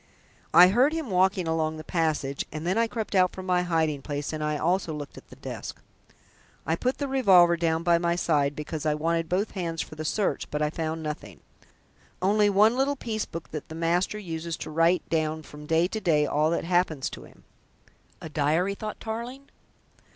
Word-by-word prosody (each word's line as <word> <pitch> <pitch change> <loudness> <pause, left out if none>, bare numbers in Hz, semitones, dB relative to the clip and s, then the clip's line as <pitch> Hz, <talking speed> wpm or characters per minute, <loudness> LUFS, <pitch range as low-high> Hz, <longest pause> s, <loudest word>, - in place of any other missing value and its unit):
I 175 +3 +8
heard 255 +9 +3
him 320 -9 -3
walking 185 -1 +2
along 160 -1 0
the 155 - -8
passage, 155 -5 -1
and 155 +1 -6
then 180 - +1
I 230 0 +2
crept 220 -1 -4
out 185 -2 +3
from 185 - -7
my 180 -1 +2
hiding 160 -5 0
place 145 +2 -4
and 155 -1 -3
I 150 0 0
also 175 +1 0
looked 145 -1 -7
at - - -14
the - - -12
desk. - - -7 0.9
I 160 - +1
put 250 +9 -1
the 285 - -2
revolver 190 -10 +5
down 165 -1 0
by 170 -1 +4
my 170 0 +1
side, 145 -5 +1
because 150 +1 -5
I 155 -1 +1
wanted 165 +1 -1
both 190 +4 0
hands 170 -4 -4
for - - -4
the 155 0 -6
search, 200 +6 -1
but 150 - -2
I 150 0 0
found 160 0 -3
nothing 130 - -6 0.8
only 205 +2 +3
one 210 +4 +4
little 275 +2 +1
piece 220 -5 -3
book 165 -1 -8
that 155 +2 -6
the 160 - -7
master 170 +5 0
uses 165 -4 -5
to - - -7
write 165 +3 +2
down 155 -1 -1
from 150 0 -12
day 165 +2 +3
to 220 - -3
day 155 -6 +3
all 150 +1 +1
that 170 - -1
happens 170 -5 +1
to - - -9
him." - - -19 0.8
"A - - -6
diary?" 155 +6 +1
thought 215 +1 -6
Tarling. 240 +5 -6
170 Hz, 200 wpm, -26 LUFS, 155-195 Hz, 0.9 s, I